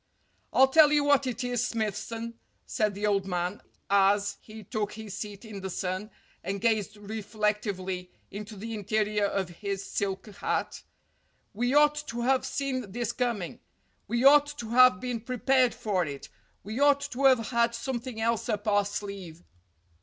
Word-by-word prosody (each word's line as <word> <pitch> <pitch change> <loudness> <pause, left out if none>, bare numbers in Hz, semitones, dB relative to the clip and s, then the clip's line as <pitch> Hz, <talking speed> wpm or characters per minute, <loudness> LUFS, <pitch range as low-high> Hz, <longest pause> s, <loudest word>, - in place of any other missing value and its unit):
"I'll 265 - +6
tell 300 +2 +6
you 295 -1 +4
what 285 -2 +3
it 250 0 -3
is, 245 0 0
Smithson," 230 +1 -3 0.3
said 210 -2 0
the 205 +1 -2
old 200 -2 +1
man, 180 +1 -2 0.3
as 200 +1 +3
he 215 0 -11
took 210 +1 -3
his 215 -2 -7
seat 210 +1 -7
in 210 -3 -8
the 190 - -4
sun 185 +3 -3 0.3
and 195 +3 -3
gazed 215 -1 +1
reflec 210 0 -2
tively 185 -3 -4 0.2
into 210 +2 -7
the 225 +3 -6
interior 210 0 0
of 195 -2 -1
his 195 -1 -3
silk 195 -1 -2
hat. 210 - -3 0.7
"We 245 +6 0
ought 295 0 +6
to 235 0 -4
have 260 +2 +2
seen 255 -7 -3
this 240 -1 -1
coming. 235 -8 -2 0.5
We 235 +1 0
ought 290 +1 +7
to 230 -5 -6
have 250 -4 +6
been 245 -1 -3
prepared 255 +1 +2
for 195 -4 0
it. 140 -3 -7 0.3
We 215 +5 -5
ought 285 0 +5
to 270 +3 -1
have 255 -5 +5
had 235 -1 +2
something 250 -3 -4
else 230 +1 0
up 210 -1 -2
our 205 -1 +3
sleeve." 195 -5 -6
215 Hz, 165 wpm, -28 LUFS, 200-245 Hz, 0.7 s, ought